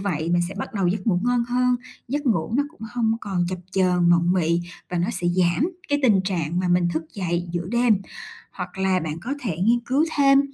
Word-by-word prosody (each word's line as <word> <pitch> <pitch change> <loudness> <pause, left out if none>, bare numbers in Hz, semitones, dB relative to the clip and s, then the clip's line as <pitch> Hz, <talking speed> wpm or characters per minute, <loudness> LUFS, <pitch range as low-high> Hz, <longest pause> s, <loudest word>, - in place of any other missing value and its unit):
vậy 170 -5 -2
mình 175 0 +3
sẽ - - -8
bắt 210 +2 -6
đầu 195 -3 +1
giấc 185 +1 -1
ngủ 180 -5 +2
ngon 245 -1 +2
hơn, 250 0 +2 0.3
giấc 290 +3 -2
ngủ 210 -5 +1
nó 285 - +3
cũng 325 - -24
hông 230 -2 +1
còn 190 -4 -1
chập 185 - -3
chờn, 180 -2 +3
mộng 175 +1 +4
mị, 170 -2 +2 0.3
và 180 - -2
nó 175 - 0
sẽ 180 -5 -2
giảm 180 - +2 0.2
cái 290 0 +2
tình 215 -7 +5
trạng 175 -3 -1
mà 180 - -1
mình 175 0 +3
thức 160 +1 -1
dậy 175 -2 -2
giữa 175 -1 -2
đêm. 235 -4 +3 0.5
Hoặc - - -7
là 190 -1 +2
bạn 160 -1 -4
có 265 +9 -3
thể 205 - -3
nghiên 230 +6 +3
cứu 275 +5 +3
thêm 275 -1 +6
190 Hz, 230 wpm, -23 LUFS, 175-240 Hz, 0.5 s, thêm